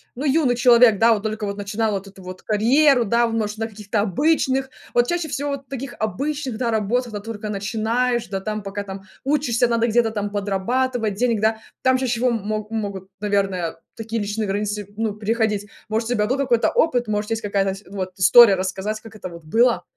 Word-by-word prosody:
ну, 275 Hz, +5 st, -4 dB
юный 275 Hz, -3 st, +3 dB
человек, 240 Hz, -3 st, +6 dB
да, 230 Hz, +2 st, +5 dB
вот 205 Hz, -1 st, -3 dB
только 215 Hz, -1 st, -3 dB
вот 200 Hz, 0 st, -4 dB
начинала 210 Hz, +2 st, -1 dB
вот 195 Hz, 0 st, -5 dB
эту 195 Hz, -1 st, -14 dB
вот 185 Hz, 0 st, -9 dB
карьеру, 250 Hz, +5 st, +4 dB
да, 235 Hz, +3 st, +2 dB
в, 225 Hz, -, -4 dB
может, 215 Hz, -1 st, -2 dB
на 225 Hz, 0 st, -2 dB
каких-то 210 Hz, 0 st, -3 dB
обычных, 265 Hz, -, +1 dB, 0.2 s
вот 240 Hz, 0 st, +3 dB
чаще 345 Hz, -2 st, -1 dB
всего 285 Hz, 0 st, -3 dB
вот 275 Hz, -2 st, -6 dB
таких 270 Hz, -1 st, -6 dB
обычных, 260 Hz, +4 st, -2 dB
да, 235 Hz, -2 st, -1 dB
работах, 225 Hz, +3 st, 0 dB
когда 205 Hz, -, -4 dB
только 215 Hz, 0 st, -6 dB
начинаешь, 225 Hz, +4 st, -1 dB
да, 195 Hz, -1 st, -2 dB
там, 215 Hz, +1 st, -4 dB
пока 200 Hz, +1 st, -4 dB
там 195 Hz, -1 st, -8 dB, 0.2 s
учишься, 260 Hz, -5 st, +2 dB
надо 235 Hz, 0 st, +1 dB
где-то 225 Hz, 0 st, +2 dB
там 205 Hz, -2 st, -3 dB
подрабатывать 210 Hz, +3 st, -1 dB
денег, 230 Hz, -1 st, +1 dB
да. 220 Hz, 0 st, +2 dB, 0.3 s
Там 260 Hz, 0 st, +4 dB
чаще 255 Hz, -2 st, -1 dB
всего 245 Hz, +2 st, +1 dB
м 235 Hz, -, 0 dB
мо 215 Hz, -1 st, -2 dB
могут, 200 Hz, -4 st, -4 dB
наверное, 195 Hz, -5 st, -1 dB, 0.2 s
такие 225 Hz, 0 st, -3 dB
личные 210 Hz, +1 st, -2 dB
границы, 205 Hz, 0 st, -2 dB
ну, 220 Hz, -1 st, -1 dB
приходить, 215 Hz, -1 st, -1 dB, 0.2 s
может, 225 Hz, +2 st, -1 dB
у -, -, +1 dB
тебя 210 Hz, -2 st, +1 dB
был 260 Hz, +3 st, 0 dB
какой-то 245 Hz, -4 st, +2 dB
опыт, 245 Hz, -8 st, +1 dB
может, 210 Hz, +1 st, -2 dB
есть 225 Hz, 0 st, -1 dB
какая-то 195 Hz, -1 st, 0 dB
сь 200 Hz, -, -13 dB
вот 185 Hz, -2 st, -5 dB
история 195 Hz, +2 st, +8 dB
рассказать, 190 Hz, +3 st, -3 dB
как 220 Hz, -1 st, -13 dB
это 205 Hz, -, -7 dB
вот 170 Hz, -1 st, -11 dB
было? 225 Hz, +2 st, +2 dB
220 Hz, 205 wpm, -22 LUFS, 205-245 Hz, 0.3 s, история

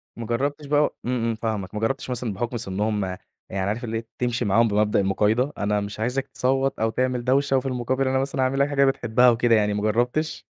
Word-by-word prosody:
ما 115 Hz, -, -6 dB
جرّبتش 140 Hz, +6 st, -2 dB
بقى 145 Hz, +1 st, +2 dB
إمم، 125 Hz, -1 st, -1 dB
إمم 115 Hz, -1 st, 0 dB
فاهمك. 110 Hz, -4 st, -3 dB
ما -, -, -1 dB
جرّبتش 130 Hz, +4 st, -1 dB
مثلًا 125 Hz, -3 st, -2 dB
بحُكم 120 Hz, +4 st, -3 dB
سِنّهم 105 Hz, -1 st, -1 dB, 0.4 s
يعني 95 Hz, 0 st, -2 dB
عارف 110 Hz, +4 st, -3 dB
اللي 115 Hz, -1 st, -2 dB
إيه 115 Hz, 0 st, -7 dB
تمشي 120 Hz, -1 st, 0 dB
معاهم 115 Hz, +3 st, +4 dB
بمبدأ 105 Hz, 0 st, +2 dB
المُقايضة، 105 Hz, +8 st, +1 dB
أنا 105 Hz, 0 st, 0 dB
مش 100 Hz, +1 st, -6 dB
عايزك 125 Hz, +4 st, -1 dB
تصوّت 135 Hz, +1 st, 0 dB
أو 110 Hz, +1 st, +2 dB
تعمل 125 Hz, +1 st, -1 dB
دوشة، 135 Hz, +2 st, +2 dB
وفي 130 Hz, -, -2 dB
المقابل 130 Hz, +1 st, -1 dB
أنا 130 Hz, 0 st, +1 dB
مثلًا 135 Hz, 0 st, -2 dB
هاعمل 130 Hz, +1 st, +1 dB
لك 140 Hz, +1 st, +3 dB
حاجة 140 Hz, -1 st, +3 dB
بتحبها 125 Hz, -2 st, +3 dB
وكده 120 Hz, 0 st, +3 dB
يعني 105 Hz, -1 st, +2 dB
ما 105 Hz, -, -2 dB
جرّبتش؟ 120 Hz, +9 st, 0 dB
120 Hz, 215 wpm, -24 LUFS, 110-130 Hz, 0.4 s, معاهم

